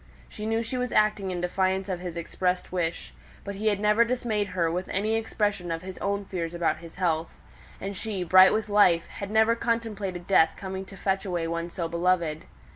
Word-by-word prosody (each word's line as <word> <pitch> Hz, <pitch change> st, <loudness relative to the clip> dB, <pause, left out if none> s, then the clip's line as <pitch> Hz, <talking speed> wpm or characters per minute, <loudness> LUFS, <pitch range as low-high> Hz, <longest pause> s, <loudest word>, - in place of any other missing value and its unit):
She 210 Hz, -, -6 dB
knew 225 Hz, +1 st, +1 dB
she 235 Hz, +3 st, -3 dB
was 250 Hz, 0 st, -2 dB
acting 210 Hz, -2 st, +2 dB
in 180 Hz, -1 st, -3 dB
defiance 190 Hz, +2 st, 0 dB
of 185 Hz, -3 st, -3 dB
his 175 Hz, -2 st, -6 dB
expressed 180 Hz, +2 st, -2 dB
wish; 165 Hz, -, -2 dB, 0.3 s
but 200 Hz, -, -5 dB
he 210 Hz, +3 st, -3 dB
had 205 Hz, -2 st, +2 dB
never 210 Hz, +2 st, +4 dB
dismayed 230 Hz, -4 st, -1 dB
her 170 Hz, -3 st, 0 dB
with 180 Hz, +2 st, -3 dB
any 210 Hz, +3 st, 0 dB
expression 210 Hz, -5 st, -1 dB
of 165 Hz, +1 st, -3 dB
his 190 Hz, 0 st, -8 dB
own 200 Hz, 0 st, -1 dB
fears 175 Hz, -3 st, -4 dB
about 170 Hz, -1 st, +1 dB
his 165 Hz, -1 st, -12 dB
health; 165 Hz, -3 st, 0 dB, 0.5 s
and 195 Hz, +1 st, -5 dB
she, 195 Hz, -2 st, -3 dB
bright 185 Hz, +2 st, +7 dB
with 215 Hz, 0 st, 0 dB
life, 205 Hz, -5 st, +4 dB
had 200 Hz, -, -7 dB
never 220 Hz, +2 st, +4 dB
contemplated 210 Hz, -7 st, -2 dB
death 160 Hz, -4 st, +4 dB
coming 190 Hz, 0 st, -5 dB
to 195 Hz, 0 st, -12 dB
fetch 195 Hz, 0 st, 0 dB
away 175 Hz, -4 st, -2 dB
one 170 Hz, +1 st, -3 dB
so 170 Hz, -1 st, -3 dB
beloved. 170 Hz, -2 st, 0 dB
190 Hz, 200 wpm, -27 LUFS, 175-210 Hz, 0.5 s, bright